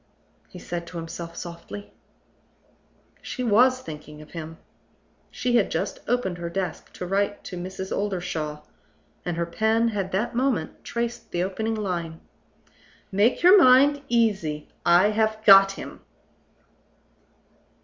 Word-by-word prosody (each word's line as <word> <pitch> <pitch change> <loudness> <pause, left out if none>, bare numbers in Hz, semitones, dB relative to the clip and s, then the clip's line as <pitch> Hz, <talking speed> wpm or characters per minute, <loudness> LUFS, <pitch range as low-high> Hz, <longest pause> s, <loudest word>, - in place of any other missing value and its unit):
he - - -11
said 170 -1 -5
to 175 - -8
himself 165 +1 -7
softly. 175 +4 -8 1.3
She 255 - -5
was 250 +3 +4
thinking 150 -6 -9
of 155 - -13
him. 165 -1 -7 0.7
She 245 -1 0
had 210 - +2
just - - -3
opened 215 -7 -1
her 170 0 -4
desk 185 +1 -4
to 180 - -6
write 200 +2 -1
to - - -7
Mrs. 185 +2 -5
Oldershaw; 175 -7 -3 0.6
and 175 -2 -3
her 170 - 0
pen 220 +6 +1
had 195 -3 -3
that 210 +7 -1
moment 240 -10 -1
traced 235 0 -4
the 175 - -1
opening 220 +4 -2
line: 170 -6 -3 0.9
"Make 205 - +2
your 370 +1 +8
mind 280 +3 +6
easy. 195 -11 0 0.2
I 175 +4 +6
have 220 0 0
got 195 -1 +8
him!" - - -9
195 Hz, 130 wpm, -25 LUFS, 170-225 Hz, 1.3 s, your